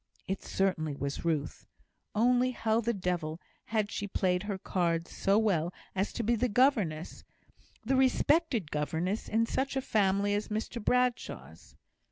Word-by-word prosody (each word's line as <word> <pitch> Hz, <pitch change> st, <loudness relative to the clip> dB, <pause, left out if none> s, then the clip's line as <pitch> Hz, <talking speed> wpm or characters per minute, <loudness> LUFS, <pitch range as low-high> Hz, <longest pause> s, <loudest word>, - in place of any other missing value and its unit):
It 190 Hz, +1 st, -2 dB
certainly 160 Hz, -6 st, -1 dB
was 140 Hz, +1 st, -4 dB
Ruth; 155 Hz, -4 st, -2 dB, 0.5 s
only 245 Hz, +3 st, +3 dB
how 225 Hz, -2 st, 0 dB
the 235 Hz, +1 st, 0 dB
devil 175 Hz, -6 st, -2 dB, 0.3 s
had 215 Hz, -2 st, -1 dB
she 205 Hz, -, -3 dB
played 180 Hz, -2 st, +1 dB
her 205 Hz, -1 st, -3 dB
cards 170 Hz, -3 st, -1 dB
so 195 Hz, +1 st, +2 dB
well 180 Hz, -7 st, +2 dB, 0.2 s
as 195 Hz, +2 st, -1 dB
to 235 Hz, -, -2 dB
be 235 Hz, +2 st, +2 dB
the 245 Hz, +2 st, 0 dB
governess 205 Hz, -, +1 dB, 0.6 s
the 265 Hz, +4 st, +2 dB
respected 265 Hz, -, +2 dB
governess, 165 Hz, +7 st, -2 dB
in 225 Hz, +1 st, +2 dB
such 270 Hz, +4 st, -1 dB
a -, -, +2 dB
family 200 Hz, -3 st, +2 dB
as 205 Hz, +1 st, -1 dB
Mr 220 Hz, +2 st, -4 dB
Bradshaw's? 250 Hz, 0 st, -1 dB
205 Hz, 150 wpm, -30 LUFS, 175-235 Hz, 0.6 s, only